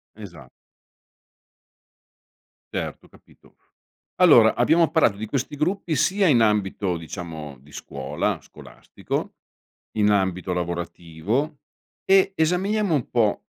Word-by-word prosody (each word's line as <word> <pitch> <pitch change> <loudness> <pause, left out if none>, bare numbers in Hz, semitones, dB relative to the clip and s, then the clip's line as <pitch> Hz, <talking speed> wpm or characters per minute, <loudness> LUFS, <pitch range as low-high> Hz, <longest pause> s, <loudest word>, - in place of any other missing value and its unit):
Esa 85 - -12 2.3
Certo, - - -5
capito. - - -23 0.6
Allora, 120 -12 +6
abbiamo 160 +7 +3
parlato 140 -10 +3
di 110 +2 -5
questi 135 +5 -3
gruppi 170 +2 -1
sia 190 +8 +2
in 135 -9 +4
ambito 100 -4 0
diciamo 80 -5 -8
di 70 +1 -19
scuola, 65 -1 -4
scolastico, - - -7 0.6
in 105 0 +3
ambito 95 -2 0
lavorativo 85 - -3 0.4
e 195 0 +4
esaminiamo 185 +3 +1
un 135 - -2
po' 110 -4 +1
110 Hz, 100 wpm, -23 LUFS, -, 2.3 s, Allora